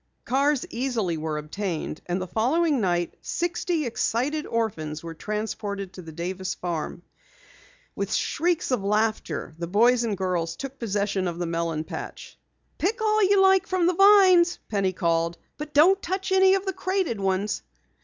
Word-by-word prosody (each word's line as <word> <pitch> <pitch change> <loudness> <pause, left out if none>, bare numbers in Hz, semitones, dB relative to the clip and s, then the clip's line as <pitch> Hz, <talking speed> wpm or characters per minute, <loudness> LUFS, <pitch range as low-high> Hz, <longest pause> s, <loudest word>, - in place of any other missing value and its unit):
Cars 275 +2 +1
easily 230 -8 -1
were 155 -1 -3
obtained, 160 +1 -4
and 175 +1 -1
the 185 - -3
following 265 - +1
night, 175 -3 0
sixty 345 -2 -1
excited 255 +6 -1
orphans 160 -10 -2
were 165 0 -6
transported 205 0 -4
to 185 - -9
the 165 -2 -10
Davis 180 +3 -4
farm. 170 -1 -4 0.9
With - - -3
shrieks 340 -4 0
of 250 -6 0
laughter, 215 -4 -1
the 170 - -3
boys 235 +6 +4
and 215 -4 -1
girls 175 -3 -1
took 275 +7 -7
possession 200 -4 -1
of 170 -1 -4
the 175 - -2
melon 165 -2 -2
patch. - - -8 0.4
"Pick 420 +8 0
all 430 0 +2
you 400 -1 +5
like 385 -1 +4
from 370 -2 +1
the 360 - +3
vines," 375 -2 +6
Penny 195 -3 +1
called, 170 -1 0 0.2
"but 300 0 -6
don't 360 +7 +5
touch 380 +2 -3
any 380 0 +5
of 390 0 -2
the 385 - -1
crated 370 - -1
ones." 195 +1 -1
220 Hz, 160 wpm, -25 LUFS, -, 0.9 s, vines